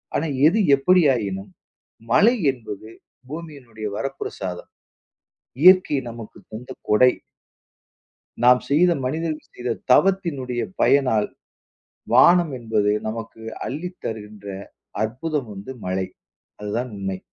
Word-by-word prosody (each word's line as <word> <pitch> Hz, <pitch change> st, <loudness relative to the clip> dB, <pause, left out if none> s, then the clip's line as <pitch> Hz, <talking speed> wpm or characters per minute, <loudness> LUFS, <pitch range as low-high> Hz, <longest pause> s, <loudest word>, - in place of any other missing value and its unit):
ஆனா 160 Hz, -, 0 dB, 0.2 s
எது 210 Hz, +6 st, 0 dB, 0.2 s
எப்படியாயினும், 125 Hz, -, +2 dB, 0.6 s
மழை 230 Hz, +4 st, +6 dB, 0.2 s
என்பது 110 Hz, -3 st, -9 dB, 0.4 s
பூமியினுடைய 140 Hz, -9 st, -8 dB
வரப்பிரசாதம். 100 Hz, -9 st, -5 dB, 0.9 s
இயற்கை 185 Hz, -4 st, +7 dB
நமக்கு 115 Hz, -2 st, -10 dB
தந்த 115 Hz, +4 st, -8 dB, 0.2 s
கொடை. 125 Hz, +4 st, +5 dB, 1.3 s
நாம் 125 Hz, 0 st, +6 dB
செய்த 175 Hz, +5 st, +4 dB
மனிதர் 155 Hz, +3 st, -2 dB
செய்த 125 Hz, 0 st, -4 dB, 0.2 s
தவத்தினுடைய 140 Hz, -9 st, +1 dB, 0.2 s
பயனால், 125 Hz, -7 st, +3 dB, 0.9 s
வானம் 170 Hz, +4 st, +6 dB
என்பது 110 Hz, -3 st, +1 dB, 0.2 s
நமக்கு 115 Hz, 0 st, -6 dB, 0.3 s
அள்ளித் 175 Hz, +7 st, -6 dB
தருகின்ற 105 Hz, -2 st, -7 dB, 0.6 s
அற்புதம் 130 Hz, +3 st, -3 dB
வந்து 100 Hz, +6 st, -8 dB
மழை. 95 Hz, 0 st, -1 dB, 0.5 s
அதுதான் 110 Hz, +5 st, -3 dB
உண்மை. 95 Hz, -1 st, -4 dB
125 Hz, 95 wpm, -22 LUFS, 110-155 Hz, 1.3 s, இயற்கை